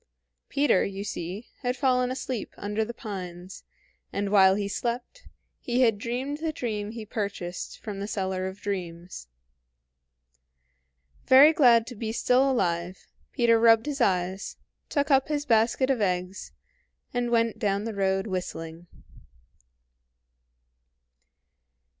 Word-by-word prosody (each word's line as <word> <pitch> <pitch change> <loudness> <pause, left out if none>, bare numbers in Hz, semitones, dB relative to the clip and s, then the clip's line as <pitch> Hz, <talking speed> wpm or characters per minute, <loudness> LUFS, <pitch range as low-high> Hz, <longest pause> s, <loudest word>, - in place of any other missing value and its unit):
Peter, 285 -9 +3
you 195 0 -4
see, 190 +2 -5 0.2
had 250 -1 -1
fallen 250 -1 +2
asleep 255 -3 -4
under 210 +2 -2
the 225 - -5
pines, 185 -5 -8 0.5
and 200 0 -2
while 190 -2 +6
he 200 0 -2
slept, 240 - -4 0.3
he 245 +1 0
had 225 -5 +3
dreamed 255 +6 -3
the 320 0 -2
dream 215 -7 -4
he 225 0 -7
purchased 200 -5 -5
from 205 -3 -6
the 200 - -4
seller 190 -2 -2
of 190 +1 -8
dreams. 175 - -5 2.0
Very 280 +4 +8
glad 240 -8 +5
to 250 - -8
be 220 0 -4
still 250 +4 +3
alive, 180 -7 -1 0.3
Peter 230 -2 +3
rubbed 225 +1 +5
his 290 -2 -3
eyes, 185 -1 0 0.3
took 285 0 0
up 270 -1 +4
his 295 -1 -2
basket 235 +2 +2
of 250 -4 0
eggs, 185 0 -2 0.6
and 245 -1 -1
went 230 -1 +1
down 200 -1 0
the 225 0 -4
road 195 -1 0
whistling. 175 -3 -5
215 Hz, 130 wpm, -26 LUFS, 190-250 Hz, 2.0 s, Very